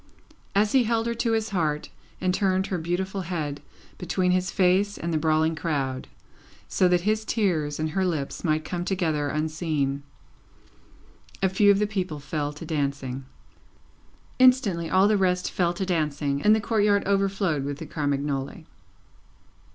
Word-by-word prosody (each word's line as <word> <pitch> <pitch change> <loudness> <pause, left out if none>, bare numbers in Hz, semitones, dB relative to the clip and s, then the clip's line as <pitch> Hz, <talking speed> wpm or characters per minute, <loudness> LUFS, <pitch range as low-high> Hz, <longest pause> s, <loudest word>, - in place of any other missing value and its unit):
As 205 +1 +3
he 260 -3 +4
held 225 0 +1
her 235 - 0
to 230 0 0
his 220 0 0
heart 155 -6 -1 0.3
and 185 0 +1
turned 190 -1 +1
her 185 -2 -2
beautiful 190 +4 -2
head 155 -5 -4 0.4
between 180 +1 0
his 185 0 +1
face 195 +2 +2
and 170 0 -3
the - - +2
brawling 160 0 +2
crowd, 140 -5 -2 0.6
so 185 - +2
that 180 -1 +3
his 215 +3 0
tears 165 -11 0
and 155 0 -1
her 190 +4 0
lips 160 -7 -2
might 155 -1 0
come 175 -1 -3
together 165 -6 0
unseen, 155 -2 -1 1.4
a 190 - +4
few 205 +2 +4
of 200 - +6
the 210 - +2
people 185 -7 -3
fell 145 +1 -3
to 150 +3 -9
dancing. 140 -4 -3 1.1
Instantly, 235 -11 +4
all 190 +2 +4
the 210 0 +3
rest 180 -1 +1
fell 175 -2 +1
to 185 +2 -3
dancing, 150 -5 -1
and 215 +5 +5
the 220 - 0
courtyard 205 -2 +2
overflowed 195 -6 +1
with 140 0 -4
the - - -7
Carmagnole. 140 -2 -2
175 Hz, 160 wpm, -25 LUFS, 150-195 Hz, 1.4 s, of